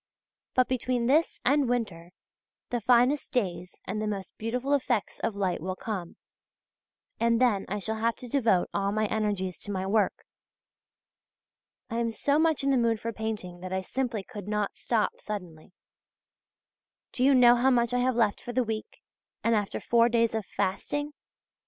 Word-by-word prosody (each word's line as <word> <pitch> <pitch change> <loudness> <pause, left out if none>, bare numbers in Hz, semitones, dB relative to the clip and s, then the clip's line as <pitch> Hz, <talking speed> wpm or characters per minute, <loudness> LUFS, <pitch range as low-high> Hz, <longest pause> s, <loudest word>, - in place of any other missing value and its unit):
But 255 -1 +4
between 250 -1 0
this 300 +7 +2
and 280 -1 +3
winter, 185 -9 -2 0.6
the 240 -1 -1
finest 250 +5 +3
days 180 -7 -2
and 210 +3 -3
the 215 - -1
most 195 -3 -4
beautiful 250 +5 -2
effects 250 -6 0
of 225 -2 -2
light 190 -5 -1
will 185 +2 -3
come, 190 -5 -5 1.0
and 230 0 +3
then 235 -6 +2
I 205 - -1
shall 220 +2 -2
have 230 +1 +1
to 250 - -10
devote 230 -8 +2
all 200 0 0
my 215 +1 +1
energies 205 -4 -1
to 205 - -6
my 190 -1 -2
work. 205 +1 +1 1.7
I 230 - -2
am 235 -1 0
so 285 +6 +1
much 320 -3 +2
in 275 - +2
the 270 - +3
mood 230 -2 +2
for 230 +1 -4
painting 215 -5 -4
that 185 +1 -7
I 190 0 0
simply 235 +1 -2
could 205 -3 -9
not 210 -1 -1
stop 225 -3 0
suddenly. 180 -6 -7 1.4
Do 250 - -1
you 275 +1 +6
know 245 -1 +7
how 250 +2 +3
much 240 -2 +2
I 250 - +2
have 255 0 +1
left 220 -4 +2
for 245 - -6
the 255 +1 +2
week, 220 -1 -6 0.4
and 230 - +3
after 205 -2 0
four 235 0 +3
days 230 -1 +2
of 220 -3 -3
fasting? 290 +10 -2
225 Hz, 175 wpm, -28 LUFS, 200-245 Hz, 1.7 s, know